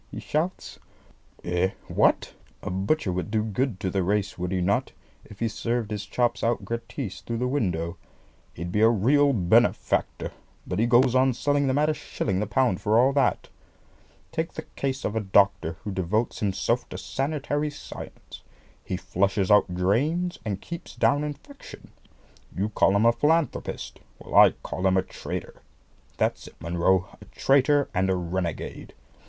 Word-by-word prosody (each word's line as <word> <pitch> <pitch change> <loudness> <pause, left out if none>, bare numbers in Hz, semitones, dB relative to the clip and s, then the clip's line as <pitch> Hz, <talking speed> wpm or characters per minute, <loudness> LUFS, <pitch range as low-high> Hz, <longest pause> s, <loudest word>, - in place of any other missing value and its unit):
he - - -7
shouts. 165 +5 -3 0.6
"Eh, 90 +1 +1 0.2
what? - - +2 0.3
A - - -3
butcher 95 +5 0
would 90 0 -3
do 110 0 +1
good 110 0 -1
to 95 - -1
the 95 - 0
race, 100 +2 0
would 90 0 -4
he 95 - 0
not, 90 +3 0 0.3
if 105 - -14
he 115 - +2
served 115 0 -2
his 105 -1 -4
chops 120 -1 0
out 115 -3 0
gratis 115 -1 -5
through 115 - -4
the 125 +2 0
window? 90 - -1 0.6
He'd 85 +2 -5
be 105 - +1
a 110 - +7
real 140 +7 +4
benefactor; 90 -9 +1 0.3
but 90 - -3
he 115 - +3
goes 120 +1 +4
on 130 -1 +3
selling 145 +2 +1
them 130 +1 +1
at 150 +1 +3
a 155 - +2
shilling 110 -9 -3
the 105 - -1
pound 115 -2 +1
for 105 +2 +2
all 130 +3 +4
that. 135 -3 +1 0.8
Take - - -2
the - - -6
case 135 -1 -2
of 105 - -2
a - - +2
doctor 95 -4 +2
who 105 - -4
devotes 95 +5 -1
himself 100 -3 0
to - - -6
sanitary 145 +1 -2
science. 145 - -10 0.4
He - - -3
flushes 100 +1 0
out 105 -2 +5
drains, 150 - 0
and 100 -4 -3
keeps 170 -1 -8
down 145 +1 +2
infection. 150 - -9 0.7
You 100 +3 0
call 100 -2 +3
him 105 +3 +3
a 115 - +7
philanthropist! 155 +6 0 0.2
Well, - - -11
I - - +9
call 95 +1 -1
him 95 0 +3
a 95 - +2
traitor. - - -7 0.6
That's - - -1
it, - - -14
Munro, 85 +3 +1
a - - -11
traitor 140 +1 +3
and 95 +1 +1
a 95 - +2
renegade! 85 -2 -4
110 Hz, 170 wpm, -26 LUFS, 95-135 Hz, 0.8 s, I